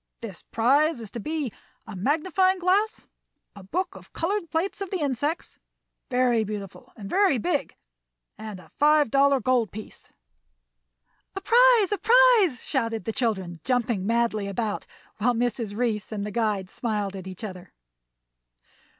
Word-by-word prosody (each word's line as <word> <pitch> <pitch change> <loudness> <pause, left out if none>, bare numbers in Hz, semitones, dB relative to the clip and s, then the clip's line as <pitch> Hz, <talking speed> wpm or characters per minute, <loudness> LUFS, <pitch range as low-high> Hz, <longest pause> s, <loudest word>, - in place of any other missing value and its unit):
This 210 -7 -7
prize 275 +6 +2
is 220 -3 -8
to 235 - -6
be 300 0 -3 0.3
a 215 -3 -8
magnifying 330 - +1
glass, 380 +4 +1 0.5
a 200 - -10
book 340 - -3
of - - -14
colored 345 0 -2
plates 345 +5 -2
of 395 - -3
the 375 - -2
insects, 290 +3 -2 0.5
very 250 -3 +2
beautiful 205 -2 -7
and 205 -3 -8
very 375 - +3
big, 290 +5 -1 0.6
and 215 -3 -8
a - - -17
five 300 -4 +4
dollar 275 0 +4
gold 245 -3 +1
piece." 215 +1 -10 1.2
"A 390 - -4
prize, 470 -2 +5
a 415 - 0
prize!" 465 - +5
shouted 230 -5 -2
the 225 - -1
children, 190 -8 -2
jumping 235 -6 0
madly 230 -3 +1
about, 210 +1 -3 0.3
while 240 +3 +2
Mrs. 230 -3 -2
Reece 225 -4 -1
and 205 -2 -3
the 210 - -5
guide 205 -4 -1
smiled 210 -4 -2
at 190 -1 -8
each 185 +4 -9
other. 185 -4 -8
240 Hz, 150 wpm, -25 LUFS, 210-325 Hz, 1.2 s, prize